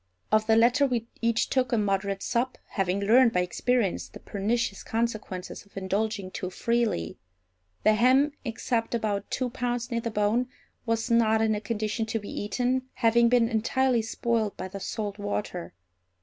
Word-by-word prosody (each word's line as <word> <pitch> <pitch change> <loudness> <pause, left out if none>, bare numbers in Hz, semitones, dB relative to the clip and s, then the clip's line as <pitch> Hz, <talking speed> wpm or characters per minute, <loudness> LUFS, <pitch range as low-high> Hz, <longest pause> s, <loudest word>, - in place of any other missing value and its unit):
Of 215 0 +3
the 220 - +5
latter 245 +5 +4
we 240 -3 -1 0.2
each 230 -1 +1
took 255 -2 +1
a 235 - +2
moderate 195 -1 0
sup, 250 +2 -1
having 195 0 -1
learned 230 +4 +5
by 180 - +3
experience 190 - 0
the - - -11
pernicious 205 0 -1
consequences 215 -5 -3
of 200 - -18
indulging 195 0 -2
too 185 - -4
freely. 230 - -1 0.6
The 215 - +5
ham, 260 +6 +4
except 230 -1 -1
about 210 -3 -2
two 255 -2 -2
pounds 245 -1 -2
near 235 0 0
the 230 - -2
bone, 215 +3 +1 0.4
was 230 +1 0
not 220 -1 +4
in 220 0 +2
a 210 - -2
condition 215 +1 -2
to 225 - -1
be 205 - -9
eaten, 250 +5 -1
having 235 -1 +4
been 240 -1 +4
entirely 240 +2 +1
spoiled 225 -1 -1
by 185 - -5
the 195 +1 -7
salt 205 +1 -4
water. 205 -3 -3
225 Hz, 165 wpm, -27 LUFS, 205-240 Hz, 0.6 s, the